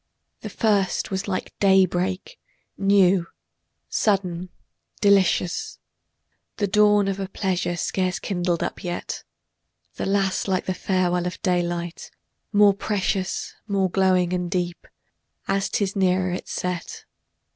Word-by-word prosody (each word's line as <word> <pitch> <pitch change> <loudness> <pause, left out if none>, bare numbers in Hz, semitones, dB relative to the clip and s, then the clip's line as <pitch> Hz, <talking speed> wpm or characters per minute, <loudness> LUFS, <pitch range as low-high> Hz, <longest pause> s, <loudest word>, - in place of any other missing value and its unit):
The - - -7
first 200 -6 +1
was 190 +1 -2
like 185 -2 -3
day 190 -1 +6
break, 185 - -3 0.4
new, 195 -3 +3 0.6
sudden, 185 -4 0 0.5
delicious, 190 -3 +2 0.8
The 205 - +1
dawn 205 0 +4
of 195 0 -2
a 195 - -3
pleasure 185 -3 -1
scarce 185 +3 -1
kindled 175 -3 -1
up - - -5
yet; 175 -1 -4 0.7
The - - -2
last 195 -1 +1
like 185 -1 0
the 185 - -1
farewell 180 -1 0
of 180 - -6
daylight, 175 -2 -1 0.4
more 205 -1 +6
precious, 195 -2 -2
More 195 -3 +1
glowing 185 -2 +2
and 180 -1 -1
deep, 175 -2 -3 0.6
as 195 0 0
'tis 195 -1 -1
nearer 185 -1 +2
its 180 - -5
set. 180 - -4
190 Hz, 125 wpm, -24 LUFS, 180-195 Hz, 0.8 s, day